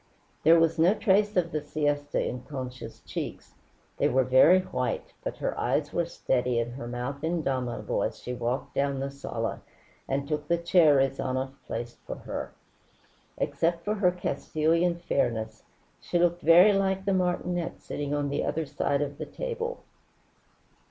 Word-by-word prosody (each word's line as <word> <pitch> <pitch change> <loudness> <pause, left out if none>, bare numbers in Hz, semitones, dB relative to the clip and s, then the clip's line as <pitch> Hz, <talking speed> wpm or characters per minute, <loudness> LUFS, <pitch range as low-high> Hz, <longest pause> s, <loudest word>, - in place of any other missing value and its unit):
There 165 +2 +6
was 165 0 +2
no 175 +6 +5
trace 205 -1 +2
of 170 -2 +2
the 155 - -1
siesta 145 -1 -1
in 125 - -4
Concha's 125 -4 -7
cheeks. - - -6 0.4
They 145 - +2
were 130 0 +3
very 130 +9 +6
white, 125 -8 -3
but - - -4
her - - -2
eyes 150 -1 0
were 170 -1 0
steady 125 -6 0
and 120 +1 -2
her 120 -2 -7
mouth 125 +4 -4
indomitable 135 -7 -1
as - - -2
she 125 - -6
walked 125 +3 -3
down 140 -1 0
the 135 +1 -3
sala 140 - -4 0.5
and 140 +1 -1
took 150 -1 -2
the 170 - +2
chair 170 -3 +5
Rezanov 135 -1 0 0.2
placed 120 +1 -5
for - - -4
her. - - -6 0.9
Except 170 0 0
for 210 - +1
her 200 -4 +3
Castilian 165 +1 0
fairness, 115 -10 -1 0.4
she - - -1
looked 175 0 +2
very 175 +6 +7
like 190 -1 0
the 195 - +2
martinet 180 -1 -1
sitting 145 -1 -5
on 145 -1 0
the 140 - -1
other 155 +2 -1
side 140 0 0
of 145 0 -6
the - - -4
table. 475 0 -4
150 Hz, 160 wpm, -28 LUFS, 130-175 Hz, 0.9 s, very